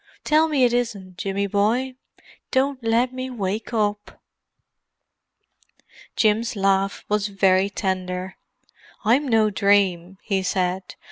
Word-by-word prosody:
"Tell 310 +1 +3
me 290 -4 +1
it 240 -1 +3
isn't, 200 -7 -3
Jimmy 200 0 -1
boy. 220 +7 0 0.6
Don't 265 -1 0
let 235 +3 +1
me 255 0 -5
wake 215 -2 -4
up." 210 -2 -2 2.0
Jim's 225 +2 +1
laugh 195 0 0
was 210 0 0
very 195 -1 +2
tender. 185 -2 -3 0.7
"I'm 260 +7 +3
no 220 -3 +3
dream," 195 -3 +1
he 195 -3 0
said. 185 0 -2
205 Hz, 115 wpm, -23 LUFS, 190-240 Hz, 2.0 s, Tell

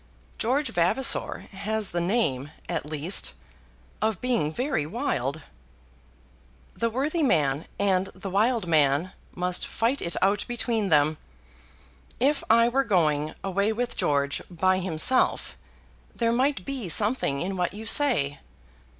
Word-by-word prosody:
George 265 +4 0
Vavasor 230 +9 +1
has 210 +1 -1
the 175 - -1
name, 170 - 0 0.2
at 160 -4 -3
least, 155 +5 -1 0.7
of 220 -4 0
being 235 -12 0
very 250 - -1
wild." 155 - -2 1.3
"The 230 - -1
worthy 285 +8 -1
man 150 - +1
and 195 -1 +1
the 190 0 -7
wild 220 +2 +2
man 155 +1 +2 0.2
must 180 0 -1
fight 240 +5 0
it 170 - -2
out 200 +2 +2
between 230 -4 -1
them. 150 0 +3 1.0
If 280 +4 +2
I 230 +1 +6
were 265 +3 +2
going 155 - +1
away 200 +2 0
with 240 +2 -2
George 140 -1 0
by 185 +1 +1
himself, 185 +8 +1 0.6
there 230 -1 +1
might 270 +4 0
be 265 -9 -4
something 205 - +1
in 190 +4 -3
what 180 -1 -1
you 220 +1 -7
say." 225 - +3
195 Hz, 130 wpm, -26 LUFS, 160-240 Hz, 1.3 s, I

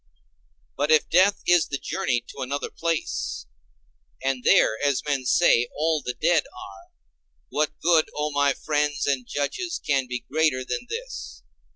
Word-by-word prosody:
But 145 +2 -1
if 155 -1 +3
death 195 +4 +4
is 175 -2 +4
the 140 - -3
journey 150 -8 -2
to 140 - -9
another 140 +2 -3
place, 160 - -3 0.8
and 135 -2 -1
there, 110 - +4
as 140 -2 +1
men 140 -3 -1
say, 125 -3 +4
all 155 0 +1
the 125 -2 -4
dead 165 -1 +3
are, 95 -5 -12 0.6
what 150 0 -1
good, 165 -1 +3
O 150 0 -1
my 145 -1 +2
friends 145 0 -1
and 135 -3 -1
judges, 340 - -3
can 135 -2 +1
be 125 -1 -5
greater 150 -4 +1
than 125 - -4
this? - - -7
145 Hz, 155 wpm, -24 LUFS, 130-160 Hz, 0.8 s, death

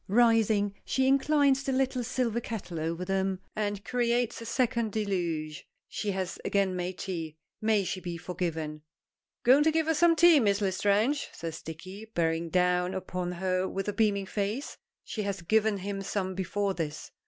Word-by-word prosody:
Rising, 220 -2 +3
she 265 0 +1
inclines 275 0 +4
the 275 - -2
little 260 -1 +1
silver 240 -1 -1
kettle 195 -8 -5
over 165 +3 -2
them, 190 0 0 0.2
and 205 -1 -2
creates 240 -1 0
a 230 - -7
second 235 -3 0
deluge. 170 -8 -2 0.2
She 210 - -3
has 190 -1 -3
again 195 -2 +1
made 180 0 -3
tea. 165 -5 -5 0.2
May 215 -2 +3
she 185 - -3
be 175 -2 -5
forgiven! 160 -3 -4 0.6
"Going 260 +4 +6
to 315 +1 +4
give 320 0 +1
us 320 -2 +1
some 345 -1 +6
tea, 330 -1 +7
Miss 200 -4 +2
L'Estrange?" 205 +7 +1
says 165 -1 -6
Dicky, 185 +6 -8
bearing 165 0 0
down 180 +1 +2
upon 180 -1 -3
her 185 +1 0
with 195 +1 -3
a 205 - -1
beaming 205 -3 +1
face. 210 +8 -3 0.3
She 215 - -4
has 200 -3 -3
given 215 +3 +2
him 195 +1 -4
some 190 -1 -2
before 195 +2 -1
this. 155 -4 -5
200 Hz, 165 wpm, -29 LUFS, 180-230 Hz, 0.6 s, tea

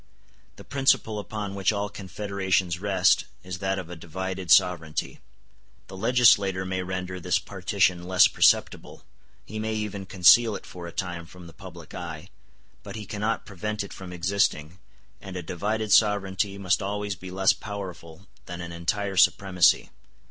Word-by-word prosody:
The - - -13
principle 130 -6 +1
upon 105 -1 -5
which 100 +1 +1
all 100 -1 -2
confederations 95 -3 -2
rest 95 -2 +2 0.2
is 90 -1 -6
that 95 +1 -1
of 90 -3 -5
a - - -6
divided 95 +2 -6
sovereignty. 85 -5 +2 0.7
The - - -9
legislator 100 -4 +3
may 95 0 -2
render 95 0 -5
this - - +1
partition 90 -1 0
less 95 -1 +6
perceptible, - - +1 0.4
he 110 +2 -6
may 110 0 -2
even 105 -2 -4
conceal 105 +4 +5
it - - -8
for 90 -1 -9
a - - -8
time 85 -3 -5
from 90 0 -13
the 85 - -13
public 90 -3 -12
eye, 85 0 -7 0.5
but - - -9
he 110 -1 -6
cannot 105 +3 -2
prevent 105 +2 -4
it 100 - -9
from 95 -2 -9
existing, 90 -2 -1 0.4
and 95 -1 -9
a 90 - -4
divided 105 +6 -3
sovereignty 100 -2 +2
must 95 -1 +1
always 105 +1 -3
be 95 0 -10
less 95 +1 +3
powerful 95 -4 -8 0.2
than 90 0 -7
an 85 -1 -6
entire 95 +4 -2
supremacy. 90 0 +4
95 Hz, 155 wpm, -26 LUFS, 90-100 Hz, 0.7 s, less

